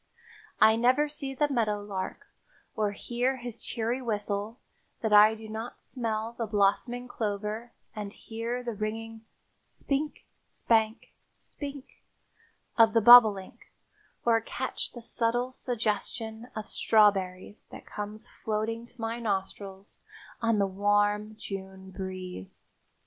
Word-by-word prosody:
I 220 0 +6
never 255 +6 +4
see 280 -2 -5
the 295 +2 +2
meadow 225 -7 0
lark 195 -2 -5 0.5
or 210 -2 0
hear 245 +5 -1
his 240 -2 -8
cheery 235 +2 -2
whistle 210 -1 -2 0.4
that 220 -2 0
I 210 +1 +8
do 220 0 -10
not 220 +2 -6
smell 225 -2 -3
the 230 -2 -3
blossoming 215 +4 +1
clover 215 0 -3 0.2
and 205 -2 -5
hear 230 +3 -5
the 240 -1 -3
ringing 225 +1 -5 0.3
"spink, 290 +2 -3 0.2
spank, 220 0 0 0.2
spink" 285 -1 -9 0.8
of 225 -1 +7
the 230 - +5
bobolink 215 -4 +7 0.5
or 230 -1 +4
catch 260 +3 -4
the 240 - -9
subtle 240 +2 0
suggestion 225 -1 -3
of 215 -1 -5
strawberries 200 -2 +2
that - - -11
comes 210 +1 -6
floating 225 +2 -3
to 245 - -19
my 225 +1 -2
nostrils 195 -2 -4 0.4
on 230 -2 +2
the 200 - +3
warm 205 +2 +1
June 190 -2 -8
breeze. 185 - -7
220 Hz, 120 wpm, -29 LUFS, 205-240 Hz, 0.8 s, I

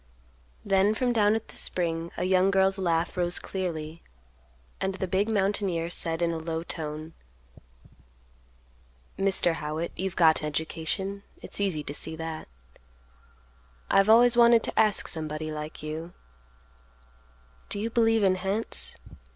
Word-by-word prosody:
Then 195 +2 +3
from 245 +1 0
down 210 -1 +3
at 225 - -5
the - - -9
spring 165 -2 0
a - - -1
young 185 +1 +3
girl's 195 0 +2
laugh 170 -1 0
rose 175 -1 +1
clearly, 165 -4 -4 0.8
and 190 0 -2
the 190 - -2
big 190 +4 0
mountaineer 195 -5 0
said 165 -1 -1
in 170 - +1
a 165 - -3
low 160 0 -4
tone, 155 -1 -6 2.0
"Mr. 195 -3 +2
Howitt, 155 +3 -3
you've 190 0 -3
got 160 -3 +4
education; 160 +6 -3 0.2
it's - - -5
easy 180 -7 0
to 145 - -5
see 160 +2 -4
that; 160 0 -6 1.4
I've 195 +2 +4
always 240 +2 +6
wanted 235 -1 +6
to - - -1
ask 215 -2 +3
somebody 155 -1 -2
like 150 0 -7
you, 160 +3 -6 1.6
do - - -3
you 225 +2 -2
believe 225 -2 +3
in 185 -1 +3
hants? 195 +4 0
180 Hz, 135 wpm, -27 LUFS, 160-200 Hz, 2.0 s, always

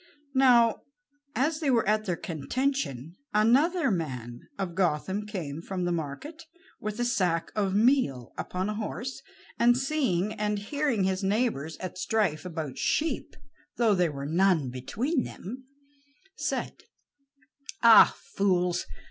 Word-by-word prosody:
Now, 245 -4 +5 0.5
as 300 +5 +1
they 300 -4 0
were 235 -6 +2
at 215 +1 +2
their 180 -4 0
contention, 165 - -3 0.2
another 275 +10 +3
man 125 - -4 0.2
of 190 -3 -3
Gotham 190 +3 0
came 165 -8 -5
from 180 0 -3
the 175 - 0
market 170 - -5 0.4
with 215 +2 -5
a 240 - +1
sack 180 -8 0
of 200 -2 0
meal 210 - +2
upon 185 +1 -3
a 210 - -2
horse, 230 +4 -5 0.4
and 240 +1 +5
seeing 255 - 0
and 210 -1 -1
hearing 245 +1 -1
his 190 +1 0
neighbors 195 - 0
at 185 0 -6
strife 200 -9 0
about 160 -6 -5
sheep, 305 -3 -1 0.4
though 230 -3 +4
there 180 -4 +2
were 140 -1 -6
none 165 -4 +2
between 240 - -1
them, 255 +7 -8 0.7
said: - - -3 1.0
"Ah, 230 -1 +8 0.2
fools! 180 - +1
200 Hz, 130 wpm, -28 LUFS, 170-240 Hz, 1.0 s, Ah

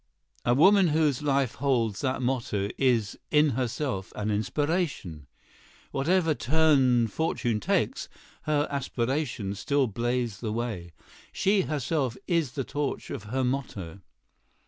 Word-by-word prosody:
A 120 - +3
woman 190 +6 +6
whose 150 -4 +2
life 140 -4 +1
holds 120 -7 0
that 130 -2 -1
motto 115 -6 -1
is 120 -6 +1
in 150 0 +4
herself 125 -4 -2
an 105 0 -2
inspiration. 110 - -1 0.6
Whatever 165 +3 +2
turn 135 -6 +3
fortune 120 -4 -1
takes, - - 0 0.4
her 150 -1 +1
aspirations 125 -6 -2
still 140 +3 +2
blaze 120 -1 -2
the 110 -3 -3
way. 110 -7 -4 0.4
She 200 0 +2
herself 145 -5 -1
is 165 -8 0
the 135 - -2
torch 145 +2 -3
of 105 - -6
her 130 +5 -1
motto. 110 -9 -3
130 Hz, 125 wpm, -27 LUFS, 115-150 Hz, 0.6 s, woman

